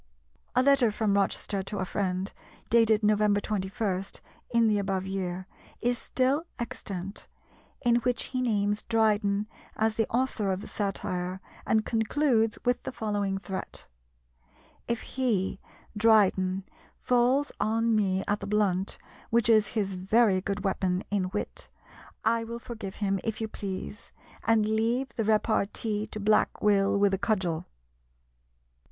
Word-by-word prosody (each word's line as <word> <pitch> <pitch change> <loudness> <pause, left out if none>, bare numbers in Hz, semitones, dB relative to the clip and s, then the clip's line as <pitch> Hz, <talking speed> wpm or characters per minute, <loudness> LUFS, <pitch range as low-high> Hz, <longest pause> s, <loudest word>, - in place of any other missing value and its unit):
A 255 - +4
letter 275 -4 +5
from 210 -1 0
Rochester 200 0 0
to 200 +2 -5
a 190 - -1
friend, 185 0 -2 0.4
dated 225 -2 +4
November 210 -1 +3
21, 195 -1 -2 0.5
in 235 -1 +3
the 210 -1 +3
above 195 -1 -1
year, 185 -1 -3 0.3
is 245 +1 +1
still 265 +5 0
extant, 195 -4 -6 0.6
in 240 -1 +4
which 240 0 0
he 255 - 0
names 205 -3 +1
Dryden 210 -2 +2 0.3
as 220 0 +1
the 225 0 0
author 235 -5 0
of 190 +1 -2
the - - -8
satire, 185 -2 -3 0.3
and 220 -1 +2
concludes 225 -1 +1
with 245 0 +2
the - - -5
following 205 -5 -1
threat: 195 -1 -6 1.0
"If 235 -1 -1
he 230 -8 -1 0.4
(Dryden) 195 -3 +3 0.3
falls 250 +4 +2
on 225 +1 +2
me 190 -2 +1
at 205 +1 +1
the 200 - -6
blunt, 200 -2 +1 0.3
which 235 0 +2
is 215 -2 +5
his 195 -2 0
very 190 +1 +3
good 200 +1 -3
weapon 185 -2 0
in 190 -3 0
wit, - - -4 0.6
I 230 +1 +2
will 230 +1 -5
forgive 225 -5 -7
him, 195 -2 0
if 225 -1 -2
you 220 - -2
please, 200 0 -6 0.4
and 225 -2 +4
leave 230 +4 +1
the 235 -1 -3
repartee 215 0 +1
to 215 - -7
Black 215 +1 +2
Will 200 -1 +3
with 200 -1 +3
a 190 - 0
cudgel." 180 -6 0
210 Hz, 140 wpm, -28 LUFS, 195-230 Hz, 1.0 s, letter